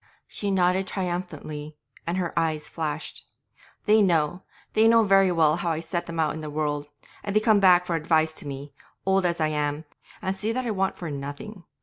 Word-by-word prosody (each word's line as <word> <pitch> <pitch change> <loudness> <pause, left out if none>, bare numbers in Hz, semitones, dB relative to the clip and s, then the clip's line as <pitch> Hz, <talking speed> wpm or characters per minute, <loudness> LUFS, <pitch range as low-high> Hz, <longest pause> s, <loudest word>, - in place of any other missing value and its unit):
She 205 - -3
nodded 185 -1 +3
again 190 - -4
triumphantly, 155 -5 -4 0.3
and 170 +2 -1
her 175 -3 -2
eyes 160 -2 0
flashed. 150 -2 -5 0.6
'They 215 0 +5
know, 175 -2 +2 0.3
they 220 +1 +5
know 230 0 +6
very 195 -2 +4
well 160 -2 +3
how 170 -1 -1
I 155 - -3
set 170 +1 -3
them 165 -1 -5
out 155 -2 +1
in 155 - -6
the 155 - -5
world. 145 -1 -2 0.4
And 200 0 -4
they - - +6
come 215 -1 +4
back 180 -2 +6
for 170 - -1
advice 160 0 +2
to - - -8
me, 140 +1 -7 0.3
old 190 -1 +3
as 170 -1 -2
I 155 -1 +2
am, 150 0 -2 0.3
and 190 +1 -2
see 210 +3 -2
that 255 +1 -2
I 230 - -1
want 195 -2 -1
for 170 -4 -5
nothing. 145 +8 -7
170 Hz, 210 wpm, -25 LUFS, 155-190 Hz, 0.6 s, know